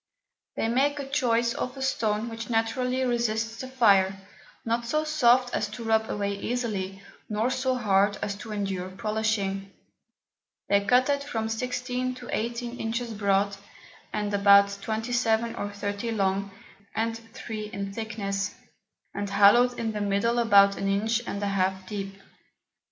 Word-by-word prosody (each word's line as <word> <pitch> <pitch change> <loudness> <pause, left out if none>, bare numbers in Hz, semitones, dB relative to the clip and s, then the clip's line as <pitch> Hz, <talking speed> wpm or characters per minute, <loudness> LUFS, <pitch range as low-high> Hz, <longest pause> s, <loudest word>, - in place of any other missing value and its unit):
They - - 0
make 275 +3 0
choice 235 -4 +2
of 255 +2 -4
a 265 - -3
Stone 220 -4 0
which 225 +1 -7
naturally 250 +3 0
resists 230 -2 -1
the 260 - -6
Fire, 200 -7 +4 0.5
not 230 +1 0
so 305 +5 +1
soft 255 -5 +3
as 210 - 0
to 210 +3 -8
rub 220 -1 +1
away 200 -1 -1
easily, 200 -6 -3 0.3
nor 220 +4 0
so 260 0 0
hard 205 -3 +2
as 200 - -2
to 220 +1 -9
endure 195 -3 -3
polishing. 200 -1 -1 1.0
They 200 0 +4
cut 250 +5 +4
it 280 0 +1
from 225 -6 -3
16 250 +2 -2
to 245 -1 -10
18 235 +2 -3
Inches 230 +1 -2
broad, 200 -1 +1 0.5
and 210 -1 -2
about 200 0 +6
27 225 +1 0
or 205 - -3
30 205 +3 -3
long, 195 -1 0 0.5
and 225 +1 0 0.2
3 215 -2 -5
in 200 -1 -5
thickness, 205 -2 -3 0.6
and 200 0 -3
hollowed 210 +5 +5
in 225 -1 -1
the 210 -1 -4
middle 205 +4 +1
about 200 -4 +5
an 195 - -2
Inch 215 +4 +1
and 200 0 -3
a - - 0
half 190 -1 0
deep. 195 -1 -5
220 Hz, 150 wpm, -27 LUFS, 200-240 Hz, 1.0 s, about